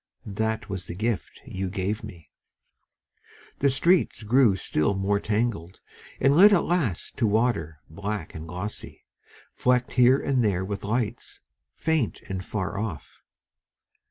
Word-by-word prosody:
That 110 +1 -2
was 95 -3 -5
the 85 - -6
gift 110 +2 -3
you 95 0 -4
gave 100 +3 -2
me.... 85 -8 -11 1.3
The 140 - +3
streets 150 -3 +2
grew 115 -1 +4
still 95 0 0
more 100 +1 +1
tangled, 105 -5 -2 0.4
And 135 +2 +4
led 200 +6 +8
at 195 - +4
last 150 - -1
to 115 - +2
water 100 -9 0
black 100 +1 -5
and 80 +1 -8
glossy, 90 +5 -7 0.5
Flecked 125 0 +1
here 125 +1 +5
and 130 -3 +1
there 95 -3 +1
with 100 0 -5
lights, 110 +2 -3 0.3
faint 160 -8 -1
and 95 -1 -4
far 100 0 -3
off. 100 -9 -6
105 Hz, 135 wpm, -26 LUFS, 95-125 Hz, 1.3 s, led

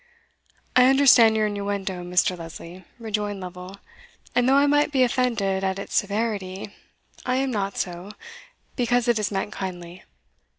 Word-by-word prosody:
"I 250 0 +7
understand 255 -5 +6
your 215 - +2
innuendo, 200 -3 -3
Mr. 180 +1 +1
Lesley," 170 +1 -10
rejoined 210 -3 -3
Lovel; 180 +1 -9 0.6
and 245 +1 +2
though 270 - +5
I 280 +1 +5
might 290 +1 +2
be 265 -3 +3
offended 230 -7 0
at 190 0 -1
its 200 - -7
severity, 205 -2 -2 0.5
I 250 - 0
am 265 0 0
not 200 -3 -2
so, 175 +2 -4 0.7
because 245 -1 +1
it 235 -2 +2
is 210 - -1
meant 195 +1 -3
kindly. 180 -2 -7
205 Hz, 145 wpm, -24 LUFS, 190-245 Hz, 0.7 s, I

